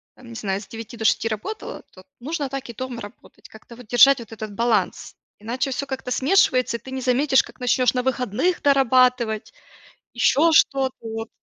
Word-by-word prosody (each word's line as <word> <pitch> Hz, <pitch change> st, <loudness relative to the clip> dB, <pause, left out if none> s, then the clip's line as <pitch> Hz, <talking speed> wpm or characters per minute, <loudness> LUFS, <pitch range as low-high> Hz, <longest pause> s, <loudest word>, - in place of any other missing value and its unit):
там, 250 Hz, -2 st, -15 dB
не 235 Hz, -, -10 dB
знаю, 195 Hz, -2 st, -3 dB
с 190 Hz, -, -13 dB
9 225 Hz, +2 st, -9 dB
до 220 Hz, -, -5 dB
6 225 Hz, -, +2 dB
работал, 230 Hz, -, -5 dB
то 185 Hz, -, -16 dB, 0.2 s
нужно 290 Hz, +3 st, -3 dB
так 270 Hz, -2 st, -6 dB
и -, -, -6 dB
дома 245 Hz, 0 st, -6 dB
работать, 205 Hz, +3 st, -14 dB
как-то 220 Hz, +2 st, -14 dB
вот 240 Hz, -2 st, -14 dB
держать 260 Hz, +3 st, +6 dB
вот 230 Hz, -1 st, -11 dB
этот 215 Hz, -1 st, -7 dB
баланс, 220 Hz, -3 st, -1 dB, 0.2 s
иначе 250 Hz, +5 st, -3 dB
всё 280 Hz, +2 st, -3 dB
как-то 265 Hz, -1 st, -5 dB
смешивается, 255 Hz, -5 st, +2 dB
и -, -, -21 dB
ты 260 Hz, +4 st, -12 dB
не 265 Hz, 0 st, -4 dB
заметишь, 265 Hz, +2 st, +3 dB
как -, -, -16 dB
начнешь 250 Hz, -1 st, +2 dB
на 250 Hz, -, 0 dB
выходных 255 Hz, -, -1 dB
дорабатывать, 255 Hz, -5 st, +2 dB, 0.6 s
еще 290 Hz, +7 st, +3 dB
что-то 270 Hz, -4 st, +3 dB
вот. 225 Hz, 0 st, -5 dB
250 Hz, 190 wpm, -22 LUFS, 225-265 Hz, 0.6 s, держать